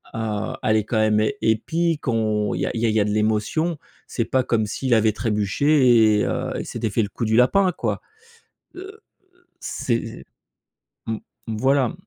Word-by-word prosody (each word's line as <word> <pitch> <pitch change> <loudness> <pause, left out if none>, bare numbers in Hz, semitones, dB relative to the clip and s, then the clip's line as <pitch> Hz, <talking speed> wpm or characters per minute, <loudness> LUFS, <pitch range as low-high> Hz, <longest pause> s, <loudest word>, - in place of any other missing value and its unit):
heu, 110 -2 -3
elle 110 0 +3
est 110 - +1
quand 110 - -2
même 110 0 +3 0.2
épique. 160 +8 0
On 110 -3 0
il - - -3
y - - +1
a - - -2
il 115 - -3
y 115 - +2
a - - +3
il 110 - -1
y - - +4
a 100 - +2
de 105 - -1
l'émotion 110 +10 0 0.3
c'est 115 - -2
pas 130 - +1
comme 115 -3 0
s'il 125 +4 -1
avait 110 -1 +4
trébuché 110 +1 +3
et - - +1
heu, - - -2
il - - -5
s'était 110 - -3
fait 110 +3 0
le 105 - -4
coup 115 - -4
du 110 0 +1
lapin 180 +10 +4
quoi. - - -3 0.7
Heu, 390 +4 -10 0.6
c'est, 115 -2 -3 0.8
mmh, 110 -1 -2 0.3
voilà 130 +3 +1
115 Hz, 190 wpm, -22 LUFS, 110-130 Hz, 0.8 s, y